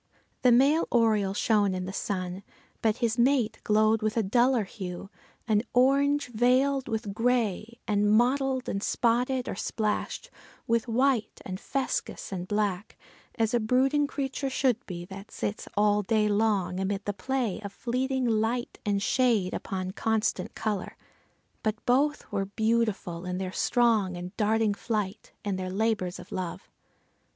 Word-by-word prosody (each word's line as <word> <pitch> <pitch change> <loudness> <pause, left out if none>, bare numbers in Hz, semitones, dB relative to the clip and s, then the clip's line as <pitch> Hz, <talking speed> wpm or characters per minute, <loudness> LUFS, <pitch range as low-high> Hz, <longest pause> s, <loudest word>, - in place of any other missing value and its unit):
The 250 - +5
male 275 +7 +4
oriole 215 -5 +2
shone 205 -3 +2
in 185 0 -3
the 190 - -6
sun, 185 -2 -3 0.4
but 220 0 +2
his 230 +1 -1
mate 240 -3 +2
glowed 215 +1 +3
with 215 +1 -1
a 225 - +3
duller 240 +3 +3
hue, 190 -1 -7 0.4
an 215 -2 +3
orange 280 +2 +3
veiled 255 +3 +2
with 220 -3 -3
gray, 230 -1 0
and 205 -1 +2
mottled 260 +3 +2
and 195 - -2
spotted 245 +3 +1
or - - -2
splashed 215 - -2 0.3
with 230 +1 +1
white 245 0 +1
and 185 0 -5
fuscous 270 -4 -3
and 180 -2 -4
black, 205 -1 -1 0.4
as 225 -1 0
a 240 - +3
brooding 265 +6 +2
creature 275 -1 -3
should 260 -2 +1
be 175 -2 -6
that 195 +2 -10
sits 205 - -4
all 210 0 +4
day 215 +1 +2
long 205 -4 +1
amid 195 +1 -2
the 205 - -1
play 245 -2 -2
of 200 - -5
fleeting 255 +4 -1
light 230 +1 0
and 200 -1 0
shade 225 -7 +2
upon 185 -1 -3
constant 220 +2 -1
color. 210 -4 -3 0.6
But 215 -1 -2
both 285 +4 +1
were 200 -1 -1
beautiful 215 -4 -1
in 180 0 -3
their 185 -1 -3
strong 220 -7 +2
and 180 +2 -7
darting 220 0 +2
flight, 210 -1 -3
and 195 -2 -1
their 185 0 -3
labors 195 -2 0
of 180 0 -12
love. 180 -3 -5
220 Hz, 150 wpm, -28 LUFS, 200-245 Hz, 0.6 s, The